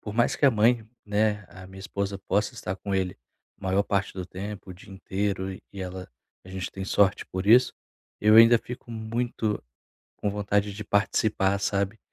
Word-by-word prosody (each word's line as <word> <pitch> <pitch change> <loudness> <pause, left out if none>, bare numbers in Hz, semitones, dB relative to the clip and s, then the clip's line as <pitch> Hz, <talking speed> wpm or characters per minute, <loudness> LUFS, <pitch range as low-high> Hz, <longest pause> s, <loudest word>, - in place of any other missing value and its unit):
por 105 0 -7
mais 120 - +2
que 140 - +3
a - - +7
mãe, 115 0 +2 0.2
né, 105 0 +1
a 95 0 -11
minha 95 0 -12
esposa 100 0 -3
possa 105 +5 -1
estar 95 -4 -4
com 100 0 -4
ele 95 -1 -1 0.4
a - - -21
maior 95 +2 +2
parte 100 -2 -1
do 90 -1 -4
tempo, 100 +1 -7
o - - -8
dia 95 - -15
inteiro, 95 0 -2
e - - -11 0.2
ela 90 0 -7 0.4
a 95 - -14
gente 95 -1 -5
tem 95 -1 -5
sorte 100 0 +2
por 95 +1 -4
isso, 125 +4 +6 0.5
eu 105 +1 +5
ainda 115 +1 +9
fico 120 0 -9
muito 110 -1 -2 0.5
com 105 - -2
vontade 100 0 0
de 105 - -6
participar, 100 -1 +1
sabe. 100 +2 -1
100 Hz, 190 wpm, -26 LUFS, 95-110 Hz, 0.5 s, ainda